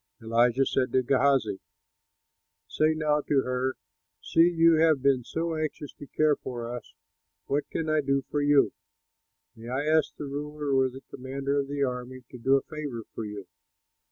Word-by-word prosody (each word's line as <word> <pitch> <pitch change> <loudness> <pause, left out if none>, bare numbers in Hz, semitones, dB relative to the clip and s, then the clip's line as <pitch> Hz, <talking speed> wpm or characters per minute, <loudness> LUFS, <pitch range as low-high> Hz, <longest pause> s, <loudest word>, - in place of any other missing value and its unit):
Elisha 120 +3 +2
said 130 -1 0
to 130 - +3
Gehazi, 135 -4 +2 1.1
"Say 155 +1 +1
now 150 -1 +1
to 145 -2 +2
her, 130 +1 -1 0.4
'See, 165 +1 +4
you 165 -1 +4
have 155 -4 +3
been 135 -3 +3
so 165 +6 -3
anxious 155 -2 -4
to 145 - -12
care 155 +1 +2
for 120 -2 -6
us; 120 - -10 0.5
what 145 +1 -1
can 165 - -2
be 155 -1 +2
done 140 -1 0
for 145 - 0
you? 145 -1 +4 0.8
May 115 +1 -11
I 135 +4 -1
ask 155 0 +2
the 150 - -6
ruler 145 0 -4
or 130 0 +3
the 130 +1 -11
commander 135 +2 -2
of 140 - -2
the 140 0 -1
army 125 0 -4
to 125 - -10
do 135 +3 +3
a 135 - +1
favor 145 -7 -6
for 110 - -5
you?'" 105 -2 -7
140 Hz, 175 wpm, -27 LUFS, 130-150 Hz, 1.1 s, See